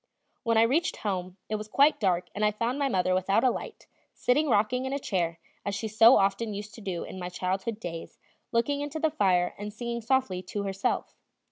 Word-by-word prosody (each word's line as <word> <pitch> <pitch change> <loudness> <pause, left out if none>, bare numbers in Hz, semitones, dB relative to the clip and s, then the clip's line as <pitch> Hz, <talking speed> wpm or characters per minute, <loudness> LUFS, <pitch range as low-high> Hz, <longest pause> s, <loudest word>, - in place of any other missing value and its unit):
When 230 -3 +1
I 225 - +7
reached 300 +10 +1
home, 185 -2 -2
it 215 - -1
was 210 0 -7
quite 280 +7 +4
dark 185 -4 +1
and 210 - -2
I 210 - +5
found 230 +6 -2
my 280 -1 +1
mother 185 -5 +1
without 195 +4 +2
a 255 - +5
light, - - -7 0.3
sitting 290 +5 +2
rocking 245 +4 +2
in 265 - -2
a - - 0
chair, 175 -10 -1 0.3
as 200 - -2
she 220 +2 -3
so 225 +3 +7
often 200 +2 +1
used 210 +2 -7
to 230 - -11
do 185 -4 -3
in 190 - -8
my 180 0 -4
childhood 190 +4 -2
days, 165 -5 -7 0.3
looking 280 +5 +1
into 290 +2 -4
the 315 -1 +1
fire 185 - +2
and 210 +1 -5
singing 235 +2 -4
softly 230 -6 +1
to 195 +2 -4
herself. 195 0 -2
210 Hz, 215 wpm, -28 LUFS, 190-245 Hz, 0.3 s, I